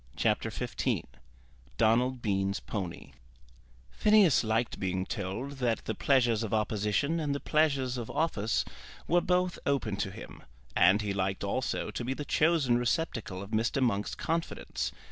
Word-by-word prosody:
CHAPTER - - +1
XV - - -2 0.7
Donald 120 +3 +2
Bean's 100 -1 0
Pony 95 -6 -5 0.8
Phineas 210 -11 +5
liked 110 +1 0
being 95 -1 -1
told 115 +7 -4
that 120 -3 0
the 110 - -1
pleasures 120 -2 +2
of 110 -1 -1
opposition 110 +9 0
and 145 -3 -1
the - - -2
pleasures 140 -6 +1
of 115 - -6
office 115 -9 0 0.4
were 175 +1 +4
both 180 0 +1
open 120 -8 0
to 95 - -1
him, - - -10 0.3
and 95 +5 +5
he 100 -1 -1
liked 95 0 -1
also 110 +6 -1
to - - -4
be 130 +2 -2
the 150 - -5
chosen 150 -8 +3
receptacle 115 - -2
of 100 - -11
Mr. 115 +5 +1
Monk's 110 -6 0
confidence. 165 0 -2
120 Hz, 145 wpm, -30 LUFS, 105-140 Hz, 0.8 s, Phineas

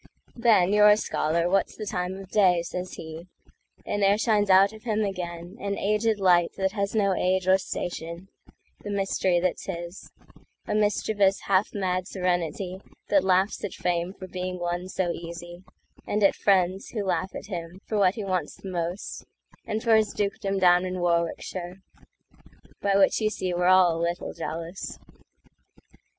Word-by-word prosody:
"Ben, 215 -6 +4
you're 210 0 +7
a 210 - +6
scholar, 170 -4 0
what's 195 +2 0
the 215 - -5
time 180 -1 -3
of 195 -1 -11
day?"Says 180 -2 +1
he; 160 +2 -8 0.6
and 205 - -2
there 200 +1 +4
shines 210 -2 +2
out 195 +2 +6
of 215 - -12
him 220 -2 -1
againAn 185 +1 -4
aged 215 +1 +1
light 175 -3 +4
that 190 0 0
has 200 0 -2
no 200 -3 +3
age 185 0 0
or 190 +1 +5
station—The 175 +3 -8
mystery 195 -3 +1
that's 180 0 -2
his—a 175 0 -10
mischievousHalf 205 -2 +1
mad 185 -2 -1
serenity 180 0 -2 0.3
that 195 -2 +4
laughs 190 +2 +1
at 205 - -4
fameFor 180 +2 -3
being 180 0 -4
won 175 +1 -3
so 185 -2 -1
easy, 170 +1 -8 0.4
and 210 0 0
at 195 - +5
friendsWho 195 +2 +1
laugh 185 0 -1
at - - -6
him 175 -2 -6
for 215 - -1
what 190 -1 +3
he 215 - -4
wants 185 -2 -2
the 190 - -8
most, 175 +2 -4 0.4
And 215 +1 -2
for 230 -2 +5
his 220 -1 +2
dukedom 200 -1 -2
down 180 -1 +5
in 185 0 -3
Warwickshire;—By 175 +3 -4
which 195 +3 +3
you 215 - +2
see 185 -4 -3
we're 175 0 +1
all 185 -3 +5
a - - -3
little 170 +1 -2
jealous. 165 +3 -6
185 Hz, 150 wpm, -26 LUFS, 175-200 Hz, 0.6 s, you're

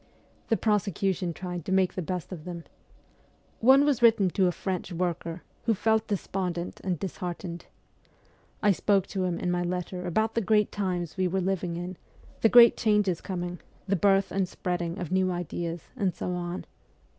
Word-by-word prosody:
The 225 - +2
prosecution 195 -4 0
tried 180 0 -5
to - - -3
make 190 -1 +3
the 185 - -3
best 180 0 -4
of 170 -5 -7
them. 175 -1 -6 1.0
One 265 +4 +6
was 280 -5 +2
written 215 -6 +5
to 190 0 +3
a - - +2
French 185 0 -4
worker, 170 -1 -3 0.2
who 225 -2 +3
felt 220 +2 +1
despondent 180 -3 -3
and 185 -2 -1
disheartened. 175 -1 -5 1.0
I 205 - +6
spoke 195 0 +2
to 190 -2 -1
him 175 -2 -1
in 180 - -1
my 175 0 0
letter 180 +1 -3
about 220 +5 +1
the 230 - +1
great 210 0 +2
times 180 -4 -2
we 185 -1 +2
were 190 +2 0
living 185 -2 -1
in, 175 +1 -5 0.4
the 225 - +5
great 235 -1 +8
changes 210 -6 +2
coming, 175 -2 -4 0.3
the 200 - +2
birth 195 +1 +3
and 190 -2 0
spreading 175 -1 -3
of 180 -5 -5
new 185 0 +2
ideas, 170 -1 -3
and 195 -7 0
so - - -3
on. 175 0 -4
185 Hz, 175 wpm, -28 LUFS, 175-200 Hz, 1.0 s, great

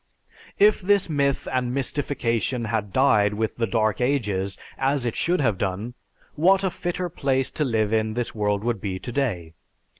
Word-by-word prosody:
If 210 +1 +5
this 200 +1 +3
myth 140 -2 0
and 125 -1 0
mystification 125 -4 -1
had 110 -2 -2
died 105 -5 +3
with 110 +1 -2
the 115 -1 0
dead 110 0 0
ages, 105 -8 0 0.2
as 135 -1 +1
it 120 - -2
should 175 -1 +1
have 110 -8 +1
done, 100 +5 -2 0.4
what 190 +5 +3
a 190 - +1
fitter 180 0 -3
place 135 -5 -1
to 150 - -1
live 110 -5 0
in 110 0 0
this 120 -1 -2
world 105 -1 0
would 115 -4 -1
be 95 -3 -3
today! 110 - -3
120 Hz, 170 wpm, -24 LUFS, 105-140 Hz, 0.4 s, If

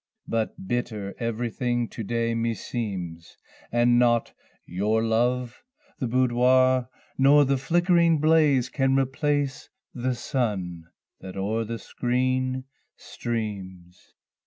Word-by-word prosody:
but 110 -4 -3
bitter 105 -4 -3
everything 120 +1 -1
to 115 - -8
day 115 +2 -1
meseems: 105 -7 -4 0.3
And 120 0 +4
nought 120 -1 +2 0.3
your 105 +5 0
love, 120 +2 0 0.4
the 130 - -1
boudoir, 130 +1 +3 0.3
nor 145 +2 +6
the 135 0 +1
flickering 170 +2 +3
blaze, 150 -5 +4
Can 135 0 +1
replace 140 +1 0 0.2
the 125 0 -2
sun 95 - -2 0.3
that 95 0 -9
o'er 110 +4 -1
the 115 +1 -4
screen 130 +2 -1 0.3
streams. 95 -6 -6
120 Hz, 105 wpm, -25 LUFS, 110-130 Hz, 0.4 s, nor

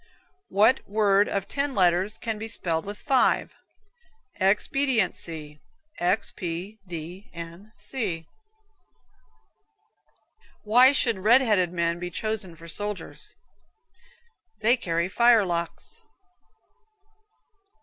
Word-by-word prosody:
What 220 +6 +4
word 205 -1 +3
of 195 -1 -2
ten 280 -1 -2
letters 185 +2 +2
can 225 -2 -4
be 220 - -5
spelled 170 -6 -2
with 205 +1 -6
five? 270 0 +1 0.9
Expediency 190 - 0 0.4
(X 180 +5 0
P 180 +4 -6
D 175 +3 -7
N 170 +5 -9
C). 190 -11 -3 2.4
Why 245 +5 +6
should 230 -7 +2
red 230 +7 +5
headed 205 -8 +2
men 170 -1 -1
be 175 0 -4
chosen 210 -1 -4
for 165 +1 -13
soldiers? 205 +4 -6 1.3
They 230 +3 +4
carry 170 -7 -1
fire 235 +1 +4
locks. 170 -2 -5
195 Hz, 100 wpm, -25 LUFS, 170-220 Hz, 2.4 s, Why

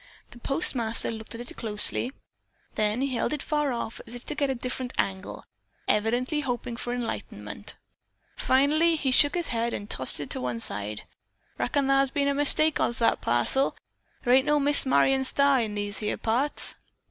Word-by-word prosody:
The 240 - -14
postmaster 235 -5 +2
looked 220 0 -8
at 230 - -7
it 240 - -8
closely. 220 +3 0 0.6
Then 215 +3 0
he 275 -1 -2
held 245 - -1
it 300 - -4
far 295 -4 -1
off 235 -2 -5
to 245 +4 -6
get 280 -1 -1
a 265 - -1
different 250 +1 -5
angle, 190 0 -3 0.4
evidently 240 +8 0
hoping 245 -3 -4
for 240 +1 -5
enlightenment. 245 -1 -6 0.6
Finally 305 +6 +2
he 280 -4 -1
shook 290 +4 +6
his 345 -1 -1
head 235 0 -1
and 205 - -7
tossed 130 -8 +3
it 145 - -7
to - - -2
one 125 -2 -3
side. 105 -1 -3 0.6
"Reckon 285 -1 0
thar's 275 0 +2
been 280 0 -1
a 280 - +1
mistake 290 +2 +4
as 235 - 0
to - - -4
that 230 - +2
parcel," 120 - +2
he - - -3
said. - - -33
"Thar 245 - +3
ain't 260 +1 +4
no 295 0 +3
Miss 285 -1 +3
Marion 265 0 +2
Starr 280 0 +3
in 215 -2 -4
these 205 0 -2
here 210 -1 -3
parts." 250 +6 +1
250 Hz, 185 wpm, -26 LUFS, 220-280 Hz, 0.6 s, shook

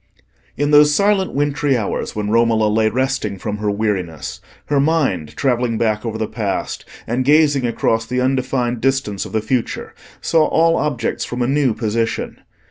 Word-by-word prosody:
In 145 +1 0
those 150 0 +6
silent 200 +1 +2
wintry 145 -1 +1
hours 105 -4 -3
when 105 -1 -2
Romola 115 -1 +3
lay 110 +1 +2
resting 130 -5 -1
from 105 +2 -4
her 105 0 -2
weariness, 100 -6 -3 0.2
her 145 -1 +1
mind, 140 - 0
travelling 120 -3 0
back 110 -2 0
over 110 -1 -3
the 110 -1 -2
past, 105 -4 -3 0.2
and 120 +3 -1
gazing 145 -2 +3
across 115 -1 0
the 125 +1 -1
undefined 125 -2 0
distance 135 -7 0
of - - -9
the 110 - 0
future, 125 +1 -2 0.3
saw 160 -2 +2
all 165 +1 +3
objects 140 -8 -1
from 120 0 -3
a - - 0
new 135 -4 +1
position. 115 0 -2
120 Hz, 165 wpm, -19 LUFS, 110-140 Hz, 0.3 s, those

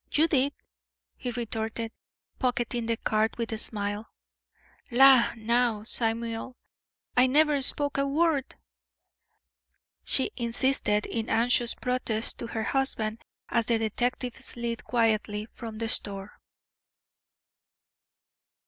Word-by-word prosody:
"You 315 +2 +3
did," 280 -3 +1 0.6
he 250 - -5
retorted, 225 -1 -3 0.5
pocketing 240 -2 -1
the 230 -1 0
card 215 +1 0
with 230 -1 -3
a 220 - -3
smile. 205 0 -2 0.8
"La, 260 -1 +6
now! 230 -1 0
Samuel, 230 +2 -1 0.6
I 250 +1 +5
never 295 +1 +3
spoke 285 +1 +2
a 275 - +1
word," 295 -1 0 1.5
she 265 - +3
insisted, 235 -3 +1
in 225 -1 -4
anxious 235 +1 +2
protest 235 -2 -1
to 235 - -4
her 225 -1 -3
husband, 230 -4 -1 0.3
as 235 -1 +1
the 235 - +4
detective 240 +3 -1
slid 235 -3 -4
quietly 215 -3 0
from 225 -3 -8
the 225 +1 -2
store. 200 -2 -1
235 Hz, 110 wpm, -27 LUFS, 225-255 Hz, 1.5 s, La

